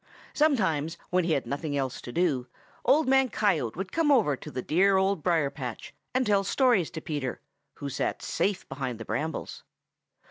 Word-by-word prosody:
Sometimes 185 - +1
when 180 -1 +2
he 165 - +2
had 140 - 0
nothing 145 +1 -3
else 135 -2 -2
to 120 - -8
do, 145 -6 +1 0.4
Old 285 +4 +4
Man 265 0 +4
Coyote 165 - +1
would 190 0 -4
come 325 -3 +2
over 215 - +4
to - - -10
the 130 - -5
dear 190 +4 +3
Old 190 -2 +1
Briar 160 -4 +2
patch 125 -5 -7 0.2
and 255 0 +2
tell 200 -2 +3
stories 230 - +3
to 160 - -7
Peter, 145 -6 -3 0.4
who 140 - -6
sat 135 - -2
safe 200 -1 -1
behind 130 -4 -4
the 115 - -6
brambles. 150 +9 -4
165 Hz, 180 wpm, -28 LUFS, 140-205 Hz, 0.4 s, Old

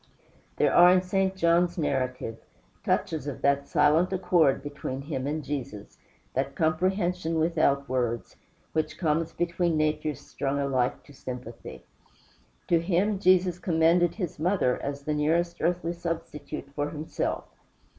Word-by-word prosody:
There - - +2
are 175 +1 +8
in 185 0 +4
St. 190 +1 0
John's 170 0 +2
narrative 130 -6 -2 0.4
touches 155 -3 -1
of 140 - -6
that 140 0 +2
silent 160 +5 +3
accord 180 -7 +2
between 140 -2 -5
him 140 -3 -3
and 155 +1 -2
Jesus, 130 -7 -6 0.3
that 135 +1 -2
comprehension 175 +1 0
without 155 -4 +2
words, 120 -2 -2 0.4
which 155 -1 -1
comes 165 -1 0
between 170 -1 0
natures 155 -2 0
strung 140 0 -3
alike 130 -3 0
to 145 - -16
sympathy. 125 -3 -8 0.8
To 170 - +4
him 190 +4 +1
Jesus 185 -2 +3
commended 170 0 +3
his 180 -8 -4
mother, 170 -6 +1
as 140 0 -4
the 150 - -1
nearest 170 +3 0
earthly 170 0 0
substitute 160 -5 -5
for 145 0 -2
himself. 155 +1 -3
160 Hz, 135 wpm, -27 LUFS, 140-175 Hz, 0.8 s, are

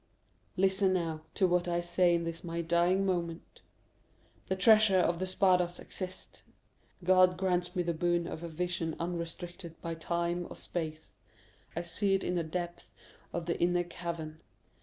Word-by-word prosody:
"Listen, 190 0 +3
now, 165 -3 -1
to 190 - +3
what 180 0 +1
I 175 0 +1
say 175 0 +3
in 170 - 0
this 165 0 -5
my 170 -1 -3
dying 175 +3 +2
moment. 170 -3 -3 0.9
The 190 - 0
treasure 215 0 +6
of 170 -2 +2
the 185 - -1
Spadas 180 -2 +2
exists. 185 -1 -7 0.6
God 185 0 +5
grants 180 -1 0
me 180 - +1
the 170 0 0
boon 175 +1 +1
of 165 - -5
vision 170 0 -3
unrestricted 170 0 -5
by 165 - -4
time 170 +1 -2
or - - -8
space. 155 -2 -5 0.6
I 170 - -2
see 195 +3 +1
it 195 - -1
in 180 - -1
the 175 - +1
depths 175 +2 -5 0.4
of 170 -1 -3
the 170 - -2
inner 175 0 +3
cavern. 170 -2 -6
175 Hz, 160 wpm, -31 LUFS, 170-185 Hz, 0.9 s, treasure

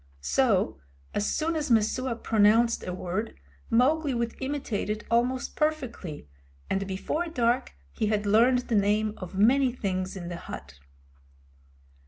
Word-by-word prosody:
So, 70 -1 +2 0.3
as 205 - 0
soon 325 +1 0
as 305 -2 -2
Messua 235 +2 +2
pronounced 225 +1 +3
a - - -2
word 185 +5 -3 0.3
Mowgli 275 +4 +3
would 235 -1 -1
imitate 265 -7 -2
it 210 0 -2
almost 245 +2 +1
perfectly, 255 - -2 0.4
and 195 0 0
before 250 - -2
dark 245 -5 0 0.2
he 215 - -1
had 210 -1 0
learned 240 +5 +4
the - - -2
names 210 +1 +2
of 185 0 -8
many 255 +5 +4
things 190 -6 -3
in 175 -2 -6
the 175 - -5
hut. 70 - -9
225 Hz, 140 wpm, -27 LUFS, 195-255 Hz, 0.4 s, learned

